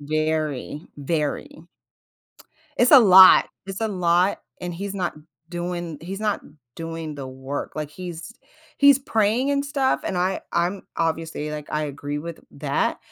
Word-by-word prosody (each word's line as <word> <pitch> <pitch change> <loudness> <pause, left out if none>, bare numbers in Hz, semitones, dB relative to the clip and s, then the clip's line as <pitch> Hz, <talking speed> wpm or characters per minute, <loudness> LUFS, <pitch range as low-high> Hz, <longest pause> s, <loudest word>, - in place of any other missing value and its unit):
Very, 155 -1 -2
very. 150 +2 -3 1.1
It's 245 - +4
a 285 - +11
lot, 190 -4 +8 0.2
it's 195 +1 -6
a 225 - 0
lot, 180 -1 +2 0.2
and 175 -1 -5
he's 200 +3 -5
not 185 -3 -2 0.3
doing 175 -2 -4
he's 190 +5 -6
not 210 -2 0 0.3
doing 165 -2 -6
the 140 -2 -7
work. 130 +2 -6
Like, 150 -1 -4
he's 175 +3 -8 0.5
he's 280 -1 +7
praying 225 +1 +1
and 280 0 +1
stuff, 275 -2 0
and 190 - -2
I 185 +2 0
I'm 175 +3 0
obviously, 160 -2 -2
like, 150 -1 -6
I 150 0 -1
agree 145 0 -5
with 165 +2 -7
that, - - -1
170 Hz, 145 wpm, -23 LUFS, 155-195 Hz, 1.1 s, a